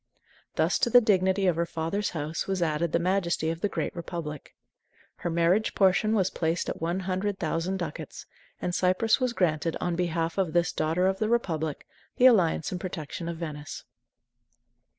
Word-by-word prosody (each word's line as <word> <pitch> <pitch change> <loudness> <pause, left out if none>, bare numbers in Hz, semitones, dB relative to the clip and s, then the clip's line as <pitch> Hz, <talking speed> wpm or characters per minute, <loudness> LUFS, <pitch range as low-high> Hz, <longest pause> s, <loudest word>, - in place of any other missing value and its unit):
Thus - - +2
to - - +2
the 245 - +8
dignity 190 -3 +2
of 180 -3 +3
her 170 - +1
father's 165 +6 -2
house 155 -1 -4
was 190 -2 0
added 160 0 0
the - - +3
majesty 170 -2 0
of 165 +1 -6
the 205 - +1
great - - -3
Republic. 165 -4 -6 0.6
Her 175 - -3
marriage 170 +6 +2
portion 200 +3 +3
was 190 -3 +1
placed 165 +1 -1
at - - -5
one 170 +3 -1
hundred 190 +2 -2
thousand 170 +3 -1
ducats, 170 -5 -6 0.3
and 180 - -2
Cyprus 185 +7 +2
was 255 -2 0
granted, 165 -4 0
on 175 -1 -1
behalf 170 0 -1
of 180 -5 0
this 175 0 +2
"daughter 160 +4 0
of 190 0 +1
the 215 - 0
Republic," 160 -10 -1 0.3
the 250 - +5
alliance 185 -11 +4
and 180 -2 -4
protection 170 -1 -5
of 170 - -4
Venice. 150 -3 -6
175 Hz, 175 wpm, -27 LUFS, 165-190 Hz, 0.6 s, the